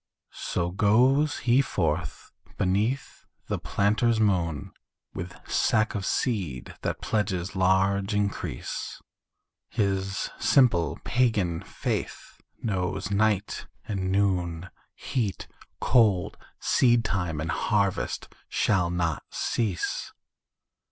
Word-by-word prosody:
So 85 0 0
goes 125 +10 +3
he 125 +2 +5
forth 80 - -2 0.3
beneath 105 +9 -1 0.2
the - - -2
planter's 110 +3 +2
moon 85 -8 +1 0.4
With 85 0 -6
sack 110 0 +2
of 100 -2 -3
seed 90 - -1
that - - -2
pledges 95 -3 -1
large 95 +2 +2
increase, 100 -1 -3 0.7
His 95 -3 -1
simple 90 - +3
pagan 105 -9 +1
faith - - -4 0.2
knows 95 -2 -1
night 105 0 +1 0.2
and 95 -3 -2
noon, 90 -3 0 0.2
Heat, 105 - -2 0.3
cold, 105 -7 +3 0.2
seedtime 100 - +2
and 80 +1 -2
harvest 100 +2 0 0.2
shall 90 -5 +2
not 85 -3 -1
cease. 105 -7 -2
100 Hz, 90 wpm, -27 LUFS, 90-110 Hz, 0.7 s, he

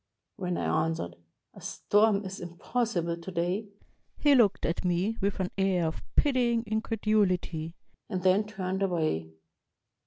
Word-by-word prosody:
When 180 -3 -2
I 155 0 +1
answered, 85 - -4 0.4
"A - - -13
storm 205 -1 +2
is 190 +1 -6
impossible 175 0 -2
to 170 +3 -8
day," 180 +5 -1 0.5
he 290 -1 +5
looked 225 -7 +4
at 165 - -1
me 180 +5 +1
with 200 +1 0
an 185 -1 -1
air 190 -3 +2
of 160 - -3
pitying 245 -5 +3
increduhty, 210 -7 0 0.3
and 185 -4 -3
then 190 +3 +4
turned 190 -2 -3
away. 155 - 0
190 Hz, 135 wpm, -29 LUFS, 170-215 Hz, 0.5 s, he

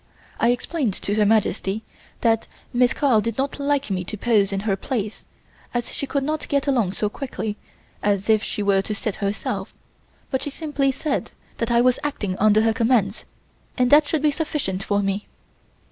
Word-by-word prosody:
I 235 - +4
explained 245 - 0
to 200 - -2
Her 210 -1 +3
Majesty 215 -1 +1 0.4
that 225 -1 +2 0.3
Miss 245 0 +4
Carl 260 -7 +3
did 230 0 -3
not 275 +2 -1
like 285 -3 0
me 185 -1 -1
to 215 - -5
pose 205 -3 +2
in 195 0 -1
her 200 -2 +1
place, 215 0 -4 0.5
as 240 -1 -2
she 280 - -3
could 280 0 0
not 305 +2 -2
get 280 -1 +1
along 240 -10 +1
so 210 - 0
quickly 220 -2 -4 0.5
as 200 -1 +1
if 220 -1 +4
she 210 - -3
were 200 -1 +3
to 210 +2 -4
sit 205 0 -3
herself; 200 0 -3 0.6
but 265 - 0
she - - -3
simply 290 -2 0
said 280 +2 -2 0.3
that 230 - -1
I 235 0 +4
was 250 0 +3
acting 210 -10 -2
under 215 +1 +5
her 225 0 +3
commands, 225 -3 +1 0.5
and 250 -1 +2
that 295 0 +7
should 310 -1 0
be 300 - +4
sufficient 280 - -2
for 205 +1 0
me. 195 +1 -2
225 Hz, 190 wpm, -23 LUFS, 205-275 Hz, 0.6 s, that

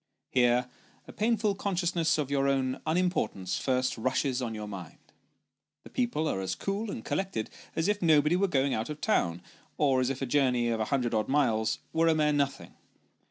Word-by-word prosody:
Here 125 0 +3 0.4
a - - -9
painful 220 -1 +1
consciousness 175 -5 0
of 145 -2 -2
your 140 -1 +2
own 130 -1 0
un 160 +2 +2
importance 105 - -1
first 130 -2 0
rushes 130 +2 0
on 115 -3 -3
your 105 -1 -5
mind 95 -5 -8 0.9
the - - -13
people 235 -11 0
are 95 - -1
as 95 0 -2
cool 205 +3 -3
and - - -6
collected 190 - -2 0.2
as 165 +2 0
if 205 0 0
nobody 155 -1 +4
were 195 +2 +2
going 140 -5 +1
out 110 +4 -2
of 150 0 -5
town, 85 - 0 0.3
or 135 -3 +3
as 125 - +1
if 135 -1 -3
a 135 - -1
journey 125 -3 +2
of 115 -1 -1
a 110 - 0
hundred 125 -1 0
odd 110 -1 +1
miles 115 -6 +2 0.2
were 165 +1 +3
a 160 - +4
mere 150 -1 +2
nothing. 140 -1 -1
140 Hz, 195 wpm, -29 LUFS, 120-165 Hz, 0.9 s, nobody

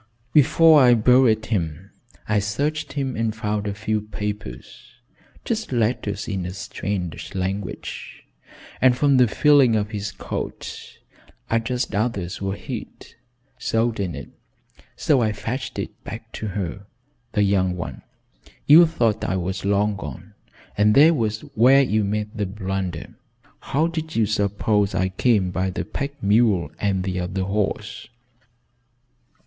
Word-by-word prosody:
"Before 155 +1 +6
I 125 -2 +6
buried 115 -1 +4
him 90 -3 -3 0.4
I 105 -1 +2
searched 145 +10 -2
him 135 -3 -2
and 115 -1 -1
found 105 -1 -2
a 100 - -2
few 110 0 -1
papers 105 - -7 0.5
just 220 -6 -2
letters 110 -4 -1
in 95 -4 -2
a 90 +1 -5
strange 95 -3 -5
language, 95 +1 -5 0.6
and 125 -1 +5
from 140 -1 +4
the 125 -1 +5
feeling 140 -1 +4
of 105 0 -1
his 105 -1 -4
coat - - -6 0.5
I 115 - +3
judged 125 0 -3
others 100 -5 -2
were 95 0 -2
hid - - -8 0.5
sewed 115 0 0
in 90 -5 -2
it, - - -8 0.7
so 140 -5 +2
I 110 -2 +1
fetched 120 +6 -5
it - - -6
back - - -8
to 110 - -5
her 100 0 -5 0.5
the 105 - +2
young 95 -2 +2
one. 85 - -6 0.6
You 165 +4 +8
thought 115 -10 0
I 95 - -1
was 95 +1 -3
long 100 +1 +1
gone, 70 -7 -8 0.4
and 105 +1 +3
there 155 +4 +7
was 110 -6 -1
where 130 +5 +6
you 110 -4 +1
made 105 +2 -2
the 105 -2 -1
blunder. 95 -3 -4 0.5
How 150 +4 0
did 160 -1 -4
you 115 - +3
suppose 105 -1 0
I 95 0 +1
came 95 -1 +1
by 95 +1 -1
the 95 - -4
pack 140 -1 -5
mule 105 -3 +3
and 95 -2 0
the 90 -1 -2
other 90 +2 -2
horse?" 100 +1 -2
105 Hz, 145 wpm, -23 LUFS, 95-120 Hz, 0.7 s, You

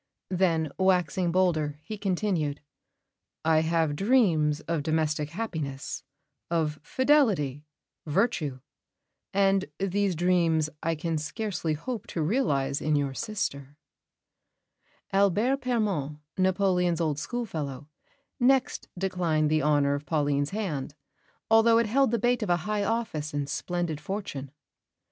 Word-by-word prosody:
Then, 165 -5 +1
waxing 180 -2 +2
bolder, 160 -5 +1
he 215 - -6
continued: 185 -7 -1 0.9
"I 160 -1 +5
have 160 -2 +1
dreams 170 - +3
of 165 -2 -2
domestic 155 -1 0
happiness, 155 -8 -4 0.5
of 155 -3 0
fidelity, 190 - +2 0.4
virtue; 150 - 0 0.7
and 195 -1 +3
these 195 -1 0
dreams 165 -3 +2
I 165 0 0
can 160 0 -2
scarcely 165 0 -2
hope 220 - -5
to 165 - -2
realise 145 - +1
in 155 0 +1
your 140 -2 0
sister." 145 - -4 1.4
Albert 205 +8 +3
Permon, 205 - -1 0.2
Napoleon's 185 -2 +2
old 155 -3 0
schoolfellow, 155 - -4 0.5
next 260 +1 +2
declined 175 -5 0
the 155 0 +3
honour 145 -1 +3
of 145 +1 -4
Pauline's 145 -2 +1
hand, 155 -9 -3 0.5
although 225 +1 +5
it 230 - +3
held 265 +5 +3
the 235 - +1
bait 240 +2 +1
of 210 - -2
a 175 - +4
high 210 -1 0
office 200 -10 -2
and 145 -1 -1
splendid 170 0 -2
fortune. 150 -7 -5
170 Hz, 120 wpm, -27 LUFS, 150-205 Hz, 1.4 s, I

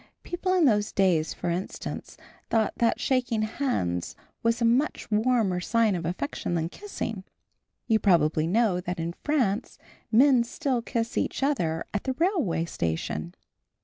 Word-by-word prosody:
People 370 +1 -1
in 355 -4 +4
those 210 -4 +2
days, 175 -5 +2
for 175 - -3
instance, 180 +3 -5 0.3
thought 220 -2 +2
that 230 -1 +2
shaking 245 -5 +1
hands 215 - -2 0.3
was 230 +1 +1
a 235 - +2
much 245 +2 +1
warmer 215 -4 +2
sign 225 +3 +2
of 170 -2 -2
affection 175 0 -3
than 165 0 -1
kissing. 225 - -5 0.6
You 220 -2 +3
probably 160 -5 +3
know 195 -1 +2
that 180 0 -4
in 165 +1 -2
France 245 - -1 0.3
men 250 +1 +6
still 260 0 -1
kiss 230 -1 -2
each - - -2
other 170 - 0
at 205 - -2
the 260 - 0
railway 305 - +1
station. 80 - -3
215 Hz, 145 wpm, -27 LUFS, 175-255 Hz, 0.6 s, men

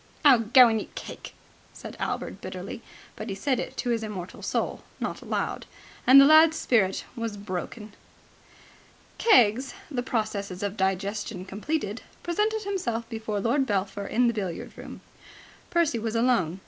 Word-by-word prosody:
"Oh, 250 -6 +6
go 250 0 +9
and 225 -2 +1
eat - - -12
cake!" - - -8 0.4
said - - -9
Albert - - -3
bitterly. - - -7 0.3
But 215 +1 -6
he 195 - -3
said 255 +5 0
it - - -5
to 245 - -1
his 230 -1 0
immortal 200 -5 -7
soul, - - -2 0.2
not - - -4
aloud. - - -3 0.4
The 255 - +6
lad's 315 +2 +7
spirit 195 -10 +1
was 230 -3 -4
broken. 205 +2 -6 1.3
Keggs, 260 - +4 0.2
the 250 -3 -1
processes 205 -6 -3
of 205 0 -2
digestion 195 0 -2
completed, 210 +3 -3 0.2
presented 425 +5 0
himself 240 - -2
before 220 -3 -3
Lord 265 +6 +1
Belpher 200 -1 -2
in 245 +2 +2
the 235 - +2
billiard 190 -6 -5
room. - - -10 0.7
Percy 335 -9 +1
was 225 0 -3
alone. 230 -8 +1
225 Hz, 145 wpm, -26 LUFS, 200-255 Hz, 1.3 s, go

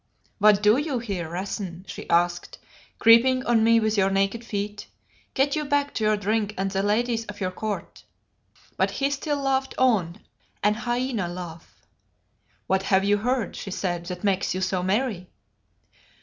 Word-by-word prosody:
"What 210 0 +5
do 210 +3 +5
you 290 -2 -1
here, 195 -8 -4
Rassen?" 185 0 -5
she - - -8
asked, 175 0 +1 0.4
"creeping 255 +3 +5
on 230 -2 +3
me 230 0 +5
with 220 -1 0
your 195 -1 +3
naked 195 +4 0
feet? 205 -1 -4 0.5
Get 275 +1 +2
you 305 - -1
back 285 0 0
to 220 - -2
your 215 0 +3
drink 210 +1 -1
and 195 +1 -1
the 195 0 0
ladies 225 +3 0
of 205 0 -8
your 185 -1 -1
court." 210 +2 -5 0.7
But - - +2
he 275 0 -1
still 290 +1 -2
laughed 270 -1 -1
on, 215 -8 +2 0.4
an 210 +1 +4
hyena 240 -2 -2
laugh. 175 -2 -9 0.8
"What 190 0 +1
have 195 0 +2
you 205 +1 +3
heard?" 245 +2 -1
she - - -6
said, 175 -2 -3
"that 180 +1 -6
makes 195 -2 0
you 185 - -2
so 185 -1 0
merry?" 190 -1 -1
210 Hz, 165 wpm, -25 LUFS, 190-240 Hz, 0.8 s, What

